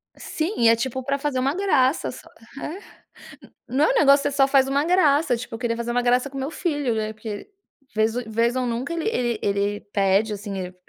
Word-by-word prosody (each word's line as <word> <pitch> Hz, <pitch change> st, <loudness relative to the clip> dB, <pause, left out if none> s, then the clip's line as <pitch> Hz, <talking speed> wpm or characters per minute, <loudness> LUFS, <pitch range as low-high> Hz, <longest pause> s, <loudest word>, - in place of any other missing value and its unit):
Sim, 325 Hz, +6 st, -3 dB
e 230 Hz, -, +6 dB
é 230 Hz, -, +6 dB
tipo 260 Hz, +2 st, -3 dB
pra 275 Hz, +2 st, -1 dB
fazer 280 Hz, -2 st, -2 dB
uma 270 Hz, +4 st, 0 dB
graça 315 Hz, -8 st, +2 dB
só, 330 Hz, -, -13 dB, 0.3 s
é. 365 Hz, +7 st, -8 dB, 0.7 s
Não, 285 Hz, -, +2 dB
o -, -, 0 dB
negócio 280 Hz, -, +5 dB
que 285 Hz, -, 0 dB
você -, -, -6 dB
só 270 Hz, -1 st, +4 dB
faz 270 Hz, -1 st, +4 dB
uma 280 Hz, +1 st, +1 dB
graça, 310 Hz, -6 st, +3 dB
tipo 235 Hz, -, -8 dB
eu 225 Hz, -, -5 dB
queria 230 Hz, -1 st, -1 dB
fazer 235 Hz, 0 st, -3 dB
uma 245 Hz, +1 st, +1 dB
graça 250 Hz, +3 st, +2 dB
com 275 Hz, -, -7 dB
meu 270 Hz, +1 st, -3 dB
filho, 290 Hz, -8 st, -1 dB
né, 215 Hz, 0 st, -2 dB
porque 215 Hz, -1 st, -7 dB, 0.5 s
vez 220 Hz, +1 st, +2 dB
vez 230 Hz, +2 st, 0 dB
ou 255 Hz, -1 st, 0 dB
nunca 240 Hz, +5 st, -3 dB
ele 335 Hz, +2 st, -2 dB, 0.4 s
ele 200 Hz, +1 st, 0 dB
pede, 200 Hz, +2 st, +2 dB
assim, 200 Hz, -1 st, -6 dB
ele 180 Hz, -1 st, -6 dB
255 Hz, 215 wpm, -23 LUFS, 225-285 Hz, 0.7 s, e